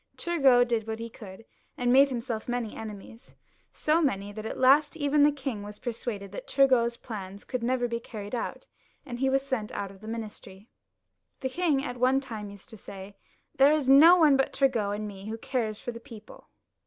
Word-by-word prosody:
Turgot 270 Hz, -8 st, +4 dB
did 225 Hz, -2 st, -1 dB
what 220 Hz, 0 st, -3 dB
he 230 Hz, 0 st, -7 dB
could, 205 Hz, 0 st, -12 dB, 0.3 s
and 245 Hz, 0 st, +2 dB
made 275 Hz, +2 st, +6 dB
himself 235 Hz, -3 st, -4 dB
many 245 Hz, -3 st, -3 dB
enemies, 220 Hz, +3 st, -10 dB, 0.4 s
so 310 Hz, +2 st, +1 dB
many 205 Hz, -9 st, -1 dB
that 215 Hz, +1 st, -6 dB
at -, -, -5 dB
last 290 Hz, +4 st, +4 dB
even 290 Hz, -1 st, +2 dB
the 295 Hz, +1 st, +6 dB
king 265 Hz, -6 st, -5 dB
was 205 Hz, 0 st, -9 dB
persuaded 225 Hz, -4 st, -5 dB
that -, -, -8 dB
Tmv 275 Hz, -1 st, +4 dB
got's 235 Hz, -2 st, +2 dB
plans 200 Hz, -4 st, -8 dB
could 255 Hz, -2 st, -4 dB
never 245 Hz, +1 st, 0 dB
be 235 Hz, 0 st, -3 dB
carried 210 Hz, -2 st, -9 dB
out, 245 Hz, -, -4 dB, 0.4 s
and 245 Hz, -4 st, -7 dB
he 270 Hz, 0 st, +2 dB
was 270 Hz, 0 st, +1 dB
sent 260 Hz, -6 st, -3 dB
out 200 Hz, -1 st, -4 dB
of 195 Hz, 0 st, -17 dB
the 215 Hz, -, -10 dB
ministry. 215 Hz, -2 st, -8 dB, 0.7 s
The 260 Hz, -, -2 dB
king 295 Hz, -2 st, 0 dB
at 245 Hz, -, -5 dB
one 255 Hz, +2 st, +3 dB
time 220 Hz, -6 st, -7 dB
used 200 Hz, +2 st, -13 dB
to 220 Hz, -, -11 dB
say, 195 Hz, 0 st, -10 dB, 0.2 s
" -, -, -42 dB
There 280 Hz, +2 st, +7 dB
is 285 Hz, -4 st, +2 dB
no 320 Hz, +6 st, +9 dB
one 305 Hz, -5 st, +5 dB
but 270 Hz, -, 0 dB
Turgot 225 Hz, -7 st, +1 dB
and 210 Hz, 0 st, -5 dB
I 195 Hz, 0 st, -11 dB
who 220 Hz, +1 st, -5 dB
cares, 230 Hz, -4 st, -3 dB
for 245 Hz, -, -5 dB
the 235 Hz, -, -9 dB
people." 230 Hz, -4 st, -14 dB
240 Hz, 210 wpm, -27 LUFS, 215-270 Hz, 0.7 s, no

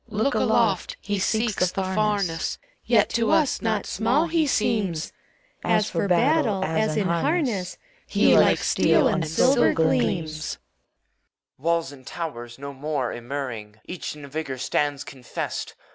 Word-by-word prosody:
CHORUS. 215 Hz, 0 st, -1 dB
Look 280 Hz, -, +1 dB
aloft! -, -, +1 dB
he 205 Hz, -1 st, -3 dB
seeks 215 Hz, -2 st, +1 dB
the 195 Hz, -, -1 dB
FamesB, 195 Hz, -3 st, -1 dB, 0.3 s
Yet 225 Hz, -3 st, +3 dB
to 230 Hz, -1 st, +1 dB
us 300 Hz, -4 st, +2 dB
not 220 Hz, -3 st, 0 dB
small 240 Hz, -, +1 dB
he 325 Hz, -2 st, +1 dB
seems. 210 Hz, -, 0 dB, 0.5 s
As 210 Hz, 0 st, +1 dB
for 200 Hz, -, 0 dB
battle, 225 Hz, -, +2 dB
as 185 Hz, +7 st, 0 dB
in 200 Hz, -3 st, +1 dB
harness, 200 Hz, -, 0 dB, 0.3 s
He -, -, +4 dB
like -, -, +5 dB
steel -, -, +3 dB
and 190 Hz, -9 st, 0 dB
silver 250 Hz, -, +3 dB
gleams. 155 Hz, +1 st, 0 dB
EUPHORION. -, -, -49 dB, 0.2 s
Walls 165 Hz, -5 st, -3 dB
and 130 Hz, -2 st, -14 dB
towers 120 Hz, -8 st, -6 dB
no 140 Hz, +1 st, -7 dB
more 140 Hz, -2 st, -2 dB
immuring. 120 Hz, -4 st, -6 dB
Each 180 Hz, -3 st, -6 dB
in 145 Hz, -1 st, -10 dB
vigor 140 Hz, -2 st, -4 dB
stands 145 Hz, +2 st, -1 dB
confessed! 130 Hz, -4 st, -6 dB
180 Hz, 145 wpm, -24 LUFS, 145-220 Hz, 0.5 s, like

